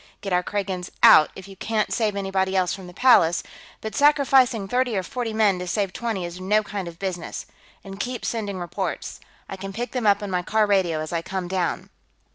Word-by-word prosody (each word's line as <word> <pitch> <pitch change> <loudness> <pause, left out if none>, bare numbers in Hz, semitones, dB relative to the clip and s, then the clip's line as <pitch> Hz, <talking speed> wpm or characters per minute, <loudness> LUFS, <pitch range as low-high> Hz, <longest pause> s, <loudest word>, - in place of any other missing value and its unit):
Get 195 -2 -3
our 180 - +3
Kragans 190 -2 -3
out 155 - +8
if 190 0 -10
you 195 - -11
can't 215 +2 -1
save 215 -3 0
anybody 195 -1 -1
else 185 -2 +2
from 190 -2 -8
the - - -10
Palace, 175 -7 +4 0.4
but 220 -1 -5
sacrificing 265 -7 +4
thirty 245 0 0
or 190 - -1
forty 235 +5 -4
men 210 -4 +2
to 180 - -5
save 195 +1 -1
twenty 225 -7 -3
is 175 +1 -7
no 210 +3 +2
kind 200 -3 -5
of 170 -1 -9
business. 180 -2 -5 0.4
And 195 0 -9
keep 245 +2 -4
sending 205 -4 -3
reports; 175 -1 -4 0.3
I 195 - -7
can 195 +1 -6
pick 240 +5 -4
them 250 -4 -1
up 205 0 +3
on 200 - -4
my 180 -1 0
car 215 +4 +2
radio 185 -6 +1
as 155 +2 -5
I 165 - 0
come 185 +1 -4
down." 180 -2 -2
195 Hz, 215 wpm, -24 LUFS, 180-220 Hz, 0.4 s, out